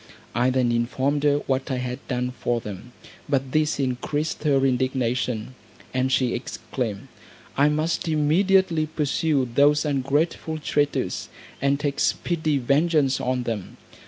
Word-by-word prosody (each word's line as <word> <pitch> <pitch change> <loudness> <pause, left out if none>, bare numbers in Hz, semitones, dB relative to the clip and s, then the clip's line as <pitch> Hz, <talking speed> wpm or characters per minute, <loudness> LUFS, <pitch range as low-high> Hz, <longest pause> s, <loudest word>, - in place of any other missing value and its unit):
I 120 +2 +2
then 130 -2 +2
informed 130 +5 0
her 145 0 +3
what 135 +1 -1
I 130 - 0
had 125 +1 -3
done 125 -1 -1
for 120 -1 -1
them, 105 +2 -8 0.4
but 135 -2 0
this 155 0 +1
increased 140 +5 -2
her 135 -2 +3
indignation; 125 -2 0 0.4
and 130 0 +1
she 130 -2 +2
exclaimed, 120 -3 -4 0.5
"I 145 +2 +4
must 155 +3 -1
immediately 165 +2 +3
pursue 150 -2 0
those 145 +3 +4
ungrateful 150 +3 0
traitors, 145 -1 -1 0.3
and 140 +1 +2
take 145 -1 -2
speedy 160 -4 +1
vengeance 140 +1 +2
on 125 0 0
them. 110 -6 -5
135 Hz, 130 wpm, -24 LUFS, 125-150 Hz, 0.5 s, I